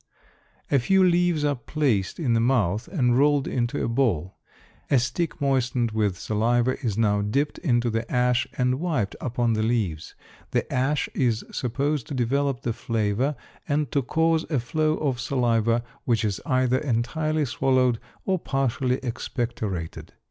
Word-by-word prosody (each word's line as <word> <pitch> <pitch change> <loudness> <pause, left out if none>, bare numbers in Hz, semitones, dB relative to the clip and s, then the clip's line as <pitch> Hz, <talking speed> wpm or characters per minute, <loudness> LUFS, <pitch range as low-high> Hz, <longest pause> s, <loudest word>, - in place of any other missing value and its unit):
A 140 - +5
few 190 +10 +3
leaves 175 -3 +3
are 145 - +2
placed 125 - -1
in 130 -8 +1
the 115 - +3
mouth 115 - +1
and 130 -9 +1
rolled 145 -1 +3
into 120 +2 -1
a - - 0
ball; 115 - 0 0.5
a 140 - +4
stick 130 +8 -1
moistened 125 -4 +1
with 105 -4 0
saliva 120 +6 0
is 110 -4 -1
now 105 -2 +2
dipped 140 +9 -1
into 120 -7 +1
the 115 +1 -3
ash 125 0 +2
and 125 +1 +1
wiped 150 - -1
upon 120 -2 0
the 110 - 0
leaves. 110 -9 -1 0.3
The - - 0
ash 135 +3 +1
is 120 -4 +1
supposed 140 +2 -1
to 145 - -5
develop 135 +1 0
the 120 - -2
flavor 115 +5 -1 0.3
and 145 -2 0
to 140 - +2
cause 160 +4 +1
a 145 -5 +1
flow 155 +5 0
of 135 -5 -1
saliva 115 -3 +1 0.2
which 115 -3 +1
is 100 -2 -2
either 130 -1 +2
entirely 150 +4 0
swallowed 125 -1 +2 0.3
or 190 -1 +1
partially 130 -3 0
expectorated. 115 - -4
125 Hz, 155 wpm, -25 LUFS, 115-145 Hz, 0.5 s, A